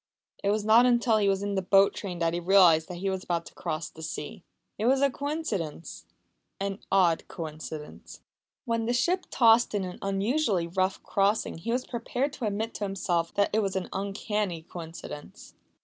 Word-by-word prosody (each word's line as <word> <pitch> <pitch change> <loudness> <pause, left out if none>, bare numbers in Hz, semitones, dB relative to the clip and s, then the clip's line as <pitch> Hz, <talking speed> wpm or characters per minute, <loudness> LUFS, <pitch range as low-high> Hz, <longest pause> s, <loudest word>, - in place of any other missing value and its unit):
It 200 - +2
was 210 0 0
not 230 +3 +6
until 240 -2 +3
he 205 -2 +3
was 195 0 0
in 205 0 -2
the 190 - 0
boat 195 +2 +4
train 185 -4 -5
that 165 -1 0
he 175 - -1
realised 175 -3 +5
that 180 - -7
he 195 +2 -1
was 190 -1 -3
about 170 -1 -2
to - - -12
cross 155 +1 -4
the 160 - -13
sea. 165 +6 -6 0.4
It 220 - +1
was 265 +1 +4
a 280 0 +3
coincidence 255 - -4 0.5
an 195 0 -3
odd 180 -4 +3
coincidence. 155 -2 -8 0.4
When 230 -2 -1
the 240 - +1
ship 350 +10 +1
tossed 230 -2 +4
in 200 - 0
an 180 -1 -6
unusually 195 - +1
rough 185 +3 -1
crossing 200 -3 0
he 230 +7 -3
was 250 +2 0
prepared 250 +4 -2
to 255 - -4
admit 215 +2 -2
to - - -5
himself 180 -4 -1
that 200 0 +2
it 220 - +3
was 195 -3 -1
an 190 -1 -2
uncanny 200 -3 -2
coincidence. 165 -3 -9
195 Hz, 190 wpm, -28 LUFS, 175-225 Hz, 0.5 s, not